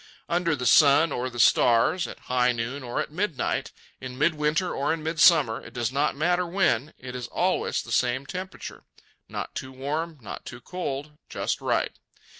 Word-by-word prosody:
Under 170 -2 +1
the 125 -3 -5
sun 145 +6 +6
or 125 +1 -2
the 120 -1 -8
stars, 120 +10 +4
at - - -10
high 125 0 +2
noon 120 +4 -4
or 120 -2 -3
at - - -3
midnight, 165 -5 -2 0.3
in 130 -1 -8
midwinter 155 +3 +1
or 140 +3 0
in 160 -1 -2
midsummer, 160 -6 +4
it 115 - -13
does 120 -1 -1
not 140 +2 0
matter 175 +4 +1
when, 155 - +1
it 125 0 -8
is 125 -1 -5
always - - 0
the - - -10
same 125 +2 +1
temperature—not 185 +5 -8
too 130 - -6
warm, 150 +5 -3
not 110 - -8
too 120 - -9
cold, 150 -1 -5
just - - -2
right. - - -1
140 Hz, 170 wpm, -26 LUFS, 125-165 Hz, 0.3 s, sun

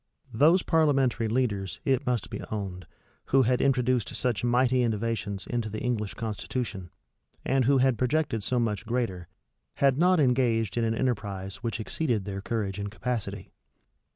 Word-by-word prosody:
Those 160 +10 +5
parliamentary 135 -7 +2
leaders, 105 -5 -1
it 130 -3 +1
must 120 -5 -1
be - - -5
owned, 95 -5 -5 0.4
who 135 0 +4
had 125 +1 +2
introduced 125 -4 +1
such 125 -3 -1
mighty 125 +1 +3
innovations 110 -3 -2
into 120 -3 -2
the 110 - -5
English 110 -5 -2
constitution, 110 -3 -4 0.6
and 135 -2 +2
who 140 +2 +4
had 130 -3 +2
projected 130 -3 0
so 125 +4 0
much 110 -2 -1
greater, 115 -8 -2 0.5
had 135 0 +3
not 180 0 +4
engaged 120 -6 +2
in 120 - +1
an 115 0 +1
enterprise 100 -6 -2
which 115 +2 -4
exceeded 115 -3 -1
their 100 -1 -4
courage 105 -3 -2
and 100 0 -3
capacity. 115 +1 -4
120 Hz, 155 wpm, -27 LUFS, 105-130 Hz, 0.6 s, Those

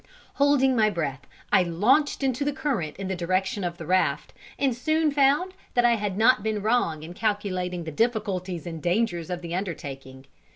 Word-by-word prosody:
Holding 275 -2 +3
my 215 -2 +4
breath, 150 -8 -4 0.3
I 195 - +7
launched 210 - +2
into 265 +1 0
the 290 - 0
current 270 - -2
in 195 0 -5
the 190 - -2
direction 185 +3 -1
of 175 -1 -3
the 165 - -8
raft, 185 +3 +1 0.2
and 270 -4 +1
soon 310 +5 +1
found 285 +6 +2 0.2
that 245 -1 +4
I 240 - +5
had 205 -3 -3
not 225 +1 +4
been 215 -1 -2
wrong 210 -9 +1
in 165 +2 -8
calculating 185 -4 -2
the 160 - -6
difficulties 190 -4 -1
and 165 -2 -6
dangers 175 -2 0
of 180 -1 -4
the 170 0 -5
undertaking. 135 -8 -6
200 Hz, 180 wpm, -25 LUFS, 175-245 Hz, 0.3 s, I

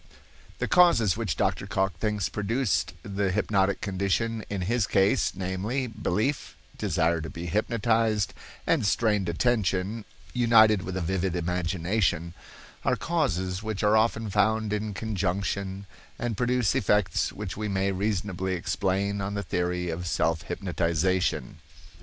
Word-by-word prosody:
The - - -1
causes 115 - +5
which - - -2
Dr. - - 0
Cocke 95 0 -1
thinks 105 -4 0
produced 110 +1 -1
the 100 -1 -1
hypnotic 100 -1 +1
condition 105 +3 -1
in 100 -2 -3
his 110 +4 +1
case, 95 +1 +2
namely, 95 +8 -2
belief, 110 +3 -2 0.2
desire 85 -4 +1
to 80 - -6
be 85 +1 -7
hypnotized, 110 +1 +1 0.3
and 160 -7 +2
strained 105 -2 +1
attention, 105 +1 0 0.3
united 110 -4 +5
with 95 0 -4
a - - -1
vivid 95 +1 -1
imagination, 85 0 0 0.5
are - - +2
causes 95 - -1
which 110 -2 -3
are 105 +1 +4
often 110 -1 +1
found 110 +1 +2
in 105 -1 -2
conjunction 100 -1 -2 0.3
and 120 -2 -2
produce 125 -3 +1
effects 95 -3 +1
which 105 -2 -6
we 105 +1 -3
may 100 0 0
reasonably 95 -1 -1
explain 100 +3 -1
on 100 +1 -3
the 100 - -2
theory 90 -1 -1
of 85 +2 -4
self 80 0 +1
hypnotization. 90 0 -1
100 Hz, 135 wpm, -27 LUFS, 90-110 Hz, 0.5 s, causes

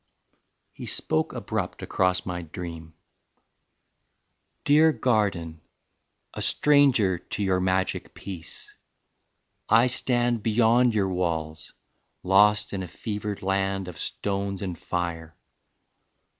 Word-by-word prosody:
XIX. - - -46 0.3
He - - -9
spoke 80 0 0
abrupt - - -4
across 90 -1 0
my 90 -1 -4
dream: 80 -1 -8 1.7
"Dear 155 +2 +5
Garden, 95 - 0 0.7
A - - -6
stranger 130 -11 +3
to 100 - -5
your 95 -1 +1
magic 95 0 -1
peace, 90 -5 -9 1.0
I 115 +2 +6
stand 120 -2 +1
Beyond 115 +2 +3
your 100 -3 +1
walls, 80 -4 -3 0.5
lost 105 +2 +4
in 95 - -2
a 90 - -5
fevered 105 +2 -5
land 95 0 -1
Of 90 -3 -9
stones 100 0 -3
and 90 -3 -3
fire. 85 -1 -4
95 Hz, 105 wpm, -26 LUFS, 90-110 Hz, 1.7 s, I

